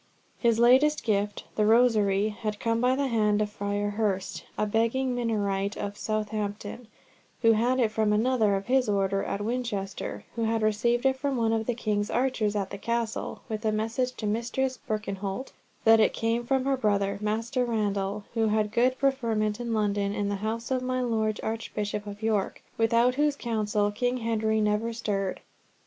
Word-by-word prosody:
His 235 -2 +3
latest 260 +6 +5
gift, 205 -1 0
the 215 - +2
rosary, 215 -3 +4
had 210 0 -4
come 230 0 0
by 250 +1 +3
the 280 +1 0
hand 215 -4 +2
of 210 -1 -1
Friar 205 0 -2
Hurst, 200 -3 -2
a - - +1
begging 230 +5 +1
Minorite 205 -4 -1
of 205 0 -4
Southampton, 215 +1 -3 0.6
who 225 - +7
had 240 +4 +2
it 225 -4 +2
from 215 -1 +1
another 220 -1 +2
of 195 0 -3
his 255 -2 +2
order 195 -1 +1
at 200 - -3
Winchester, 220 -5 -3
who 230 -1 0
had 225 0 0
received 235 +4 +1
it 265 0 +3
from 270 0 -1
one 225 -1 +2
of 225 -1 -1
the 245 - 0
king's 210 -2 -1
archers 235 -4 0
at 195 -2 -2
the 200 - -6
Castle, 235 0 -2
with 215 0 -4
a 220 - +2
message 225 +4 -1
to 215 - -5
Mistress 235 +4 -1
Birkenholt 205 +2 -3 0.3
that 225 0 +7
it - - +4
came 230 +1 -1
from 265 0 +1
her 270 -1 +1
brother, 200 -4 0
Master 225 +4 -1
Randall, 205 -3 -1
who 225 -1 +2
had 210 -1 +1
good 255 +3 +2
preferment 230 -6 0
in 240 -1 -3
London, 205 -2 0
in 205 -1 -1
the 200 - -1
house 230 +3 -3
of 255 -1 +1
my 255 0 -1
Lord 220 -3 0
Archbishop 210 -2 -3
of 205 +1 -8
York, 215 -3 0
without 230 +2 +3
whose 295 +2 +1
counsel 210 -4 0
King 245 +4 0
Henry 220 -2 0
never 210 +2 0
stirred. 195 -4 -2
220 Hz, 180 wpm, -27 LUFS, 205-240 Hz, 0.6 s, who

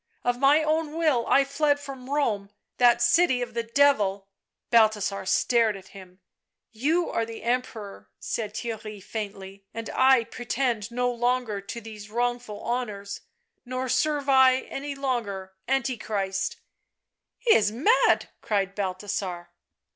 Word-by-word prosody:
" - - -42
Of 245 0 0
my 285 +3 +5
own 310 0 0
will 300 -8 +2
I 275 - +5
fled 285 +1 +1
from 270 -2 -9
Rome, 225 -9 0 0.3
that 240 -1 +5
city 255 0 +4
of 245 - -7
the 235 - -1
Devil 230 -6 +2 0.2
!" - - -61
Balthasar 215 -4 +3
stared 230 -2 +2
at 190 - -14
him. 185 -1 -14 0.3
" - - -61 0.2
You 340 +2 +2
are 230 - 0
the 225 -1 -8
Emperor," 225 - -3
said 210 - -4
Theirry 220 -2 -5
faintly, 195 -2 -7
" - - -53
and 230 -1 -5
I 260 -2 +5
pretend 240 -2 -2
no 245 +1 0
longer 240 -3 -1
to 200 +4 -7
these 215 -2 -10
wrongful 240 -2 -2
honours, 210 -5 -3 0.4
nor 255 +1 -3
serve 285 +3 +1
I 265 -1 +5
any 280 +1 -6
longer 220 -9 -3
Antichrist 225 - -1 0.3
" - - -59
" - - -61
He 475 -2 +4
is 210 -1 +3
mad 325 - +3
!" - - -48
cried 195 -2 -1
Balthasar. 185 -3 -4
235 Hz, 155 wpm, -26 LUFS, 205-265 Hz, 0.4 s, my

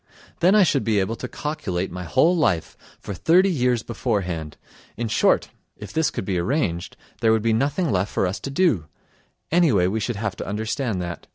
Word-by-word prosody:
Then 180 +4 +4
I 210 - +7
should 140 -8 +2
be 110 -2 +2
able 100 +4 -1
to 125 - -5
calculate 120 - -3
my 90 0 -6
whole 160 - +3
life 95 - 0 0.2
for 100 - -6
thirty 180 - +4
years 125 -6 +1
beforehand. 90 - -3 0.4
In 120 +1 -2
short, 110 - +2 0.3
if 105 -1 -9
this 160 -1 +2
could - - -5
be 95 -2 -1
arranged 90 - -1 0.2
there 115 -1 +3
would 110 -1 +2
be 115 -1 +2
nothing 145 +8 0
left 95 +1 0
for - - +1
us 90 +3 -2
to - - -6
do; 135 - +1 0.6
anyway, 150 - +4
we 100 +5 0
should 120 +2 -2
have 105 -1 -3
to - - -6
understand 110 -1 -2
that. 85 -1 -7
110 Hz, 195 wpm, -23 LUFS, 95-145 Hz, 0.6 s, I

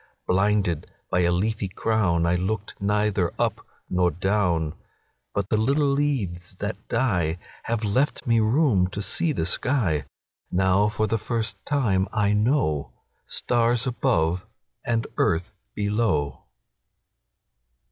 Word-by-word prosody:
Blinded 95 -4 +1 0.2
by 90 - +2
a 85 -1 +3
leafy 100 +2 0
crownI 90 -5 +1
looked 105 +1 -3
neither 105 -3 +1
up - - 0 0.2
nor 90 -1 +2
down—But 90 +1 -2
the 110 - +2
little 140 +6 +2
leaves 105 -12 -1
that 105 +2 -3
dieHave 90 -10 +1 0.5
left 130 +9 0
me 115 -2 +3
room 110 - +3
to 100 +2 -5
see 165 - +1
the 80 - -1
sky; 90 - 0 0.5
Now 95 +3 +3
for 110 +1 0
the 110 +1 0
first 110 -3 -3
time 110 -10 +2
I 105 -1 +2
knowStars 115 - 0
above 90 -8 0 0.4
and 115 -1 0
earth 85 +5 +1 0.2
below. 105 - 0
100 Hz, 110 wpm, -25 LUFS, 90-115 Hz, 0.5 s, a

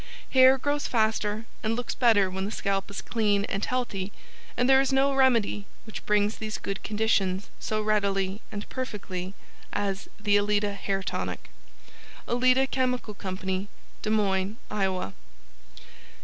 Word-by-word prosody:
Hair 260 0 +7
grows 290 +2 -1
faster 220 -1 0 0.2
and 220 +1 0
looks 245 +1 -3
better 220 -6 +4
when 190 +1 -3
the 200 - -2
scalp 195 -2 -1
is 200 - -6
clean 205 -3 +1
and 200 -1 -3
healthy, 210 -6 -2 0.5
and 245 - +3
there 265 0 +7
is 270 - 0
no 270 +1 +3
remedy 235 -6 +3 0.2
which 220 - -8
brings 210 0 +2
these 215 0 -3
good 195 -1 -4
conditions 205 -3 0
so 215 0 -1
readily 200 -1 +1
and 205 0 -5
perfectly, 200 -7 -5 0.4
as 195 0 -2
the 205 -1 +3
ALETA 205 0 +1
HAIR 195 -1 -2
TONIC. - - -4 0.8
ALETA 255 +2 +4
CHEMICAL 250 -4 -1
CO. 190 0 -3 0.3
DES 215 - -2
MOINES, 200 -1 +1
IOWA. 190 - -1
210 Hz, 140 wpm, -27 LUFS, 195-240 Hz, 0.8 s, Hair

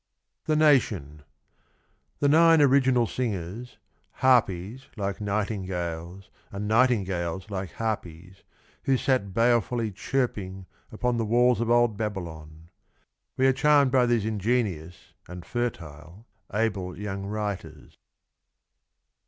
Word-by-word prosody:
THE 155 - +1
NATION. 110 - +2 1.0
The 145 - +3
nine 165 +2 +6
original 130 -3 +4
singers, 110 0 -4 0.4
harpies 120 -2 +1
like 100 0 -3
nightingales, 95 -4 -4 0.2
and 100 +1 -4
nightingales 95 -6 0
like 95 -3 -5
harpies, 95 -4 -5 0.4
who 135 -1 +3
sat 125 -7 0
balefully 115 +1 +1
chirping 100 -4 -3 0.3
upon 120 +2 -1
the 115 - 0
walls 120 +2 +3
of 115 - -1
old 120 -3 +3
Babylon. 85 -6 -6 0.7
We 130 - +2
are 135 - +5
charmed 145 -1 +4
by 125 -2 +3
these 120 -3 +1
ingenious 105 -6 -2
and 90 0 -9
fertile 85 -5 -5 0.3
able 100 -4 -2
young 100 -1 -5
writers. 105 -2 -5
105 Hz, 105 wpm, -26 LUFS, 95-125 Hz, 1.0 s, nine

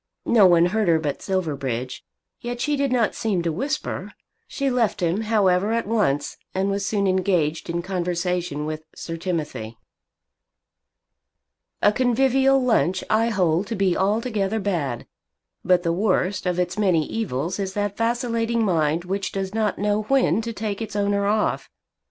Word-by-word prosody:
No 215 -5 +6
one 170 -1 +5
heard 210 +3 0
her 165 -1 +5
but 150 -3 -3
Silverbridge, 140 - -3 0.4
yet 240 0 -5
she 295 +4 0
did 280 -2 0
not 240 -4 +2
seem 195 -6 -1
to 170 - 0
whisper. 270 - -3 0.3
She 275 - -2
left 240 -4 +1
him, 175 +3 0
however, 205 -2 +2
at 230 0 0
once, 190 -10 0 0.2
and 195 +1 +1
was 200 0 -1
soon 200 -2 0
engaged 180 -4 0
in 170 0 -2
conversation 180 -4 -2
with 155 0 -4
Sir 165 - -6
Timothy. 150 -10 -4 2.1
A 205 - +6
convivial 265 +3 +3
lunch 220 -7 +1
I 225 +2 +3
hold 185 -3 +1
to 230 - -3
be 195 -3 +1
altogether 215 +1 0
bad, 165 - -2 0.6
but 180 0 +3
the 170 -1 +1
worst 190 0 0
of 180 -1 0
its 180 +3 -1
many 180 -7 +2
evils 185 - -3
is 190 -1 -3
that 205 -1 -1
vacillating 230 0 0
mind 165 -3 +1
which 195 +1 -2
does 195 0 -3
not 215 -2 0
know 205 +1 +1
when 255 0 +2
to 230 +1 -4
take 215 -1 -4
its 220 -2 -5
owner 200 0 +1
off. 210 +1 0
195 Hz, 155 wpm, -23 LUFS, 175-220 Hz, 2.1 s, No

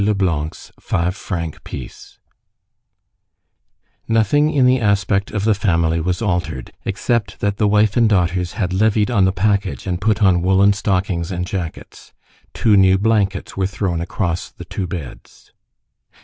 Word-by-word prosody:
LEBLANC'S 90 -7 -1
FIVE 90 +2 -1
FRANC 85 -6 -5
PIECE - - -9 1.9
Nothing 115 +7 +2
in 140 -5 +2
the 130 +1 +4
aspect 100 -2 +1
of 105 -2 -3
the 110 0 +3
family 85 -5 +1
was 90 +5 -2
altered, 85 - -2
except 110 +2 -1
that 100 0 -1
the 105 - +2
wife 105 0 +3
and 115 -2 +4
daughters 90 -3 0
had 90 -3 -2
levied 105 +2 +2
on 100 -5 +3
the 95 - +2
package 100 - -1
and 90 -1 -3
put 105 0 +1
on 90 -3 +4
woollen 95 +2 +4
stockings 95 -3 -1
and 90 -1 -2
jackets. 90 -4 -7 0.4
Two 110 -3 +2
new 95 -1 +5
blankets 100 -2 0
were 95 -1 0
thrown 95 -3 -2
across 85 0 -3
the - - -12
two 95 - -4
beds. 80 -7 -9
95 Hz, 150 wpm, -19 LUFS, 90-105 Hz, 1.9 s, new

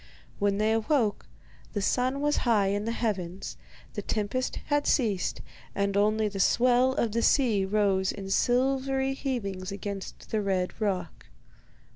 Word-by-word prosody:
When 200 -1 +1
they 215 +1 +2
awoke, 225 -1 0 0.5
the 205 - -1
sun 255 +6 +1
was 295 0 +1
high 210 -5 +2
in 205 +1 -1
the 230 - -1
heavens, 195 -6 -3 0.4
the - - -3
tempest 220 +5 -2
had 290 0 +1
cased, 210 -9 +1 0.3
and 200 0 0
only 215 +1 +2
the 200 -1 -5
swell 250 +5 +4
of 235 -5 0
the 230 +2 0
sea 230 -7 +3
rose 195 -1 +1
in 195 -1 -7
silvery 265 +3 +1
heavings 200 -9 -3
against 200 0 -7
the 220 - +1
red 190 +1 -1
rock. 185 -6 -2
215 Hz, 145 wpm, -28 LUFS, 195-250 Hz, 0.5 s, swell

